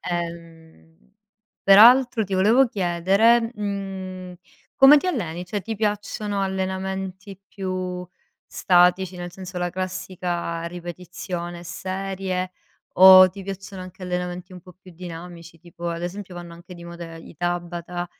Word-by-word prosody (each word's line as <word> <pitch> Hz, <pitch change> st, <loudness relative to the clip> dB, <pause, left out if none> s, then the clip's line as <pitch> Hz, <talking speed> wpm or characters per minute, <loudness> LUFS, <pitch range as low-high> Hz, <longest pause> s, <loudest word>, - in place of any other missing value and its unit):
Ehm 165 Hz, -, -8 dB, 0.5 s
peraltro 235 Hz, +4 st, +7 dB
ti 195 Hz, -1 st, -4 dB
volevo 230 Hz, +7 st, +4 dB
chiedere, 200 Hz, +4 st, +2 dB
mhmm, 190 Hz, -3 st, -5 dB, 0.4 s
come 280 Hz, +2 st, +8 dB
ti 370 Hz, -, -5 dB
alleni? 180 Hz, -, -3 dB
Cioè 200 Hz, +1 st, -4 dB
ti 225 Hz, +4 st, -4 dB
piacciono 205 Hz, -1 st, -2 dB
allenamenti 190 Hz, 0 st, -4 dB
più 185 Hz, -2 st, -4 dB, 0.4 s
statici, 180 Hz, +1 st, +2 dB
nel 175 Hz, 0 st, -7 dB
senso 185 Hz, 0 st, -9 dB
la 175 Hz, 0 st, -2 dB
classica 180 Hz, -2 st, -4 dB
ripetizione 175 Hz, 0 st, -7 dB
e -, -, -12 dB
serie, 185 Hz, +1 st, -4 dB, 0.4 s
o 185 Hz, 0 st, +9 dB
ti 195 Hz, +1 st, -10 dB
piacciono 195 Hz, 0 st, -7 dB
anche 185 Hz, +1 st, -12 dB
allenamenti 180 Hz, 0 st, -4 dB
un 180 Hz, -, -10 dB
po' 180 Hz, +1 st, -16 dB
più 185 Hz, 0 st, -17 dB
dinamici? 170 Hz, -1 st, -10 dB
Tipo 170 Hz, +1 st, -8 dB
ad 170 Hz, 0 st, -4 dB
esempio 185 Hz, +1 st, -6 dB
vanno 175 Hz, -1 st, -9 dB
anche 170 Hz, +2 st, -12 dB
di 170 Hz, 0 st, -12 dB
moda 170 Hz, -1 st, -9 dB
i 165 Hz, -, -13 dB
Tabata, 175 Hz, +1 st, -4 dB
185 Hz, 130 wpm, -23 LUFS, 175-195 Hz, 0.5 s, o